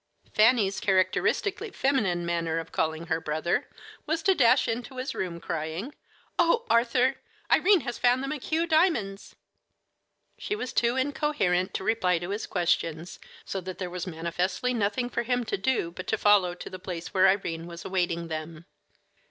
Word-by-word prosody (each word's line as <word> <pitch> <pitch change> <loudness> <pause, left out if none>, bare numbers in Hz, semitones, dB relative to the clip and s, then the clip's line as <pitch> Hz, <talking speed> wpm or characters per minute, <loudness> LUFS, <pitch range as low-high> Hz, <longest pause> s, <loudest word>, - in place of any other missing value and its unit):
Fanny's 215 -3 +4
characteristically 195 - +1
feminine 215 - 0
manner 165 -1 -1
of 165 -1 -5
calling 160 +1 -1
her 165 -1 -1
brother 155 +2 -1 0.4
was 320 +1 -1
to 385 - +5
dash 255 -4 +4
into 245 +3 -4
his 255 +2 -3
room, 175 -2 -4
crying: 165 - -4 0.5
"Oh, 460 +8 +3
Arthur, 245 +3 +3 0.3
Irene 385 -2 +5
has 240 -3 -5
found 250 +2 +3
the - - -3
McHugh 310 +3 -1
diamonds!" 310 - +1 1.0
She 420 - -2
was 255 - -5
too 235 +1 +2
incoherent 260 - 0
to - - -2
reply 190 -4 +2
to 175 +3 -5
his 205 +2 -3
questions, 170 -1 -1 0.3
so 190 - -4
that 185 0 -7
there 180 -2 -4
was 180 +1 -5
manifestly 180 +8 -1
nothing 220 +2 0
for 240 - -2
him 245 +1 0
to 225 - -2
do 195 -4 0
but 185 +2 -8
to 220 - +1
follow 200 -4 +4
to - - -8
the 185 - -7
place 175 -2 -6
where 190 0 +5
Irene 170 -4 0
was 170 0 -9
awaiting 175 -3 -1
them. 160 +1 -6
195 Hz, 165 wpm, -27 LUFS, 175-255 Hz, 1.0 s, to